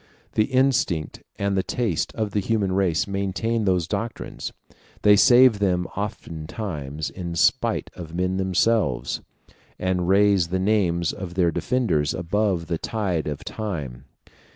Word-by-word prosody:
The 110 - +3
instinct 130 - +1 0.2
and 100 0 0
the 95 - +2
taste 105 -6 -1
of 110 -2 -2
the 105 - 0
human 100 -1 0
race 95 -3 +1
maintain 100 +3 -1
those 90 -4 +1
doctrines; 110 +4 -4 0.5
they 105 0 +7
save 120 0 +6
them 90 -3 +1
oftentimes 80 -6 -5
in 85 -2 -5
spite - - +1
of 85 -2 -8
men 90 +1 0
themselves, 95 +3 +1 0.6
and 90 -1 -1
raise 100 -3 +4
the 95 +2 -1
names 95 -4 +1
of 90 -2 -7
their 90 -3 +3
defenders 85 - 0
above 90 0 0
the 85 -1 -2
tide 95 -8 -2
of 75 -1 -4
time. 75 - -5
95 Hz, 135 wpm, -24 LUFS, 85-105 Hz, 0.6 s, they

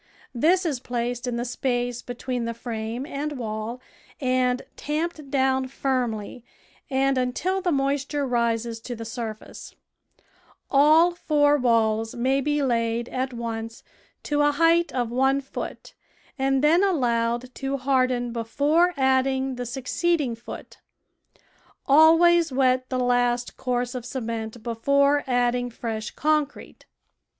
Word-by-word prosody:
This 350 +9 +2
is 290 -7 -1
placed 245 0 -3
in 245 - -2
the 240 +1 -2
space 245 -1 -2
between 245 0 -4
the 230 0 -4
frame 230 +1 -5
and 295 0 -4
wall 220 +1 -4 0.4
and 255 -2 +1
tamped 305 -1 -3
down 265 -1 +1
firmly 250 -4 -2 0.5
and 270 -1 +1
until 350 +10 -1
the 355 -2 0
moisture 280 0 0
rises 235 -2 -1
to 245 +1 -6
the 225 0 -7
surface; 225 -2 -7 1.0
all 310 +5 +6
four 295 -4 +2
walls 225 -4 +1
ma}^ 265 +3 +1
be 295 0 0
laid 235 -1 0
at 260 +1 -2
once 230 -1 -5 0.4
to 295 0 0
a 290 - +4
height 335 +3 +3
of 245 -3 -2
one 265 +2 +2
foot 275 - -7 0.4
and 270 0 +1
then 330 +5 +5
allowed 245 -7 0
to 270 +1 -3
harden 255 -2 +1
before 295 +10 +1
adding 265 0 +1
the 245 -1 -5
succeeding 265 +3 -1
foot; 230 +1 -10 1.1
always 330 +3 +6
wet 255 -1 +2
the 255 - -1
last 245 -1 +1
course 245 -1 -2
of 250 -2 -5
cement 230 -2 -5
before 280 +5 +2
adding 245 -1 +1
fresh 225 -2 -5
concrete. 300 -1 -2
255 Hz, 125 wpm, -24 LUFS, 235-280 Hz, 1.1 s, all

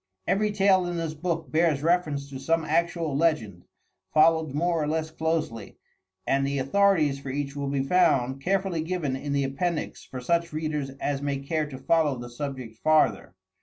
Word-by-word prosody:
Every 210 +2 +1
tale 195 -3 +3
in 175 -1 -3
this 165 -2 -2
book 165 -2 -3
bears 155 -3 +2
reference 155 -5 +1
to 135 - -6
some 165 +3 0
actual 165 -1 0
legend, 120 - 0 0.5
followed 160 -2 +3
more 170 +1 +1
or 150 - -1
less 160 +1 -1
closely, 160 -9 -2 0.5
and 135 0 +2
the 140 +1 -1
authorities 150 -1 +2
for 140 - -7
each 140 +1 -3
will 140 -1 -3
be 140 -1 0
found 135 -5 +2
carefully 190 -1 0
given 160 -5 -2
in 140 +2 -5
the 140 0 +1
appendix 155 +5 -2
for 130 - -8
such 170 +5 0
readers 155 -3 -2
as 140 -1 -1
may 140 -1 -1
care 150 +3 -2
to 135 - -7
follow 150 0 +2
the 120 0 -8
subject 130 -4 -6
farther. 155 -12 +2
155 Hz, 175 wpm, -26 LUFS, 135-165 Hz, 0.5 s, tale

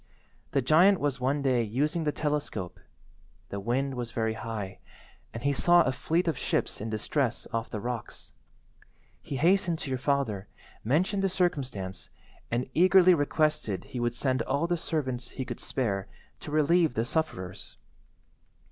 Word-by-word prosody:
The 140 -2 +1
giant 175 +8 +5
was 140 -3 -1
one 140 +3 +1
day 130 -3 +3
using 145 +9 0
the 150 - +2
telescope; 145 - -2 0.7
the 100 - -4
wind 130 +6 -1
was 120 -2 -4
very 110 -1 0
high, 105 -4 -5 0.5
and 115 +1 -7
he 140 0 +2
saw 175 +5 +5
a 130 - +1
fleet 170 +6 0
of 160 -6 0
ships - - -1
in 110 - -3
distress 120 +3 -1
off 115 0 -2
the 105 - -4
rocks. 120 0 -5 0.9
He 140 - -5
hastened 175 +3 +3
to 140 - -5
your 130 - -1
father, 130 -8 0 0.4
mentioned 180 - +1
the 195 - +2
circumstance, 135 - -2 0.4
and 120 +2 -1
eagerly 185 +1 +6
requested 150 - 0
he 125 - -6
would 120 0 0
send 130 -1 +1
all 140 +4 0
the 175 +1 +1
servants 130 -7 -2
he 130 - -5
could - - -6
spare 100 -7 -2 0.3
to - - -8
relieve 155 0 +3
the 115 - +1
sufferers. 120 - -3
135 Hz, 155 wpm, -28 LUFS, 115-155 Hz, 0.9 s, eagerly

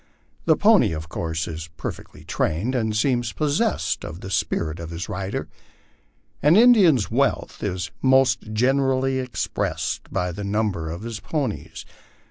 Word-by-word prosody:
The - - +5
pony, 205 - +5
of 80 +1 -6
course, 80 -1 -3
is 80 0 -6
perfectly - - -7
trained, 100 +12 -1
and 110 -4 0
seems 120 -2 +1
possessed 145 - 0
of 85 +2 -7
the 95 - -7
spirit 85 -4 -1
of 85 -1 -6
his 85 +1 -5
lider. 95 +1 -4 0.9
An 150 +4 +5
Indian's 200 - +6
wealth - - 0
is 90 -1 -3
most 130 -4 +3
generally 130 +3 +2
expressed 125 -2 -3
by 90 0 -1
the 100 +4 -6
number 100 -5 -1
of 85 +5 -6
his 115 -2 -5
ponies. 80 - -4
110 Hz, 140 wpm, -23 LUFS, 85-135 Hz, 0.9 s, Indian's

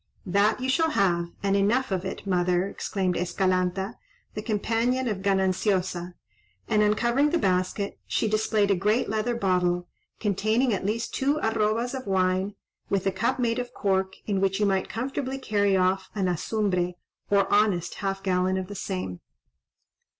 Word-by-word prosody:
"That 200 +5 +2
you 255 - -2
shall 320 +5 +2
have, 175 - +1 0.2
and 195 0 +2
enough 215 +5 +2
of 190 0 -1
it, 190 - -5
mother," 180 -1 +1
exclaimed 190 -2 -2
Escalanta, 185 +3 0 0.3
the 210 - -4
companion 230 +4 0
of 210 -4 -1
Gananciosa; 190 -2 0 0.5
and, 210 - +3
uncovering 235 +7 +3
the 345 - +1
basket, 185 - 0
she - - 0
displayed 215 -1 +2
a - - +4
great 210 +6 +1
leather 220 +3 0
bottle, 180 -4 +1 0.3
containing 215 +4 +1
at 195 0 -2
least 230 +3 -2
two 280 +3 +1
arrobas 220 +2 +1
of 260 -3 -5
wine, 190 +1 +1 0.3
with 195 -1 0
a 195 - +2
cup 190 +7 0
made 240 -1 0
of 245 0 -5
cork, 190 -1 0
in 195 -3 0
which 195 +1 +1
you 210 - +3
might 190 -1 +1
comfortably 265 +3 -3
carry 205 -6 +1
off 185 +1 +1
an 195 -3 0
azumbre, 180 0 0 0.4
or 200 -1 +3
honest 205 -5 +2
half 195 -1 -2
gallon 185 0 +1
of 190 - -2
the - - -5
same. 185 - -4
200 Hz, 160 wpm, -26 LUFS, 185-220 Hz, 0.5 s, a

